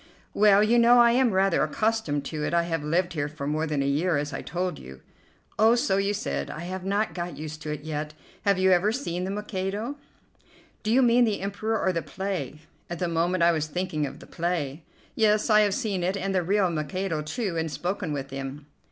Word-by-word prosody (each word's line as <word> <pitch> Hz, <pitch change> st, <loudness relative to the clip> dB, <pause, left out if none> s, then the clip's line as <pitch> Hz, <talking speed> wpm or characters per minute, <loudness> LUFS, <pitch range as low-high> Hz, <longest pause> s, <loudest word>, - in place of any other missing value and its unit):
"Well, 205 Hz, 0 st, +5 dB
you 235 Hz, +3 st, +4 dB
know, 235 Hz, +1 st, +6 dB
I 240 Hz, -1 st, +7 dB
am 250 Hz, +1 st, +3 dB
rather 190 Hz, -2 st, +2 dB
accustomed 155 Hz, -4 st, 0 dB
to 150 Hz, 0 st, -4 dB
it. 170 Hz, -, -1 dB
I 170 Hz, -, +3 dB
have 165 Hz, -2 st, -2 dB
lived 170 Hz, +4 st, 0 dB
here 145 Hz, -3 st, -1 dB
for 145 Hz, -2 st, -7 dB
more 155 Hz, +2 st, -1 dB
than 145 Hz, -2 st, 0 dB
a -, -, -2 dB
year, 150 Hz, +4 st, +1 dB
as 145 Hz, 0 st, -3 dB
I -, -, -4 dB
told 180 Hz, +2 st, -3 dB
you." 65 Hz, +1 st, -12 dB, 0.6 s
"Oh, 225 Hz, +2 st, +6 dB
so 195 Hz, -5 st, +1 dB
you 200 Hz, +1 st, +1 dB
said. 70 Hz, -, -3 dB
I 155 Hz, -, -6 dB
have 185 Hz, +1 st, -5 dB
not 200 Hz, +3 st, 0 dB
got 175 Hz, -1 st, -5 dB
used 155 Hz, +1 st, -7 dB
to 150 Hz, 0 st, -4 dB
it 150 Hz, -1 st, -4 dB
yet. 155 Hz, 0 st, -4 dB, 0.3 s
Have 200 Hz, -2 st, +2 dB
you 190 Hz, 0 st, +3 dB
ever 185 Hz, +4 st, +4 dB
seen 180 Hz, -8 st, -3 dB
'The -, -, -3 dB
Mikado?'" 210 Hz, +5 st, -3 dB, 0.8 s
"Do 215 Hz, -, -1 dB
you 260 Hz, +3 st, +5 dB
mean 240 Hz, 0 st, +5 dB
the 215 Hz, -4 st, -1 dB
Emperor 210 Hz, +3 st, -2 dB
or 185 Hz, -, +1 dB
the 170 Hz, -, -1 dB
play?" 175 Hz, -8 st, -4 dB, 0.3 s
"At 175 Hz, -, -4 dB
the 175 Hz, -, -1 dB
moment 170 Hz, +2 st, +1 dB
I 170 Hz, -, +6 dB
was 155 Hz, -2 st, -1 dB
thinking 155 Hz, -3 st, -2 dB
of -, -, -9 dB
the -, -, -13 dB
play." 170 Hz, -4 st, -3 dB, 0.3 s
"Yes, 215 Hz, 0 st, +2 dB
I 215 Hz, -, +7 dB
have 205 Hz, -2 st, +2 dB
seen 210 Hz, -8 st, -2 dB
it, 190 Hz, +3 st, 0 dB
and 195 Hz, 0 st, -2 dB
the 185 Hz, -, +2 dB
real 190 Hz, +1 st, +2 dB
Mikado, 160 Hz, +2 st, -2 dB
too, 170 Hz, +5 st, -3 dB
and 160 Hz, 0 st, -1 dB
spoken 175 Hz, 0 st, -3 dB
with 135 Hz, -2 st, -4 dB
him." 135 Hz, +1 st, -6 dB
180 Hz, 225 wpm, -26 LUFS, 155-205 Hz, 0.8 s, I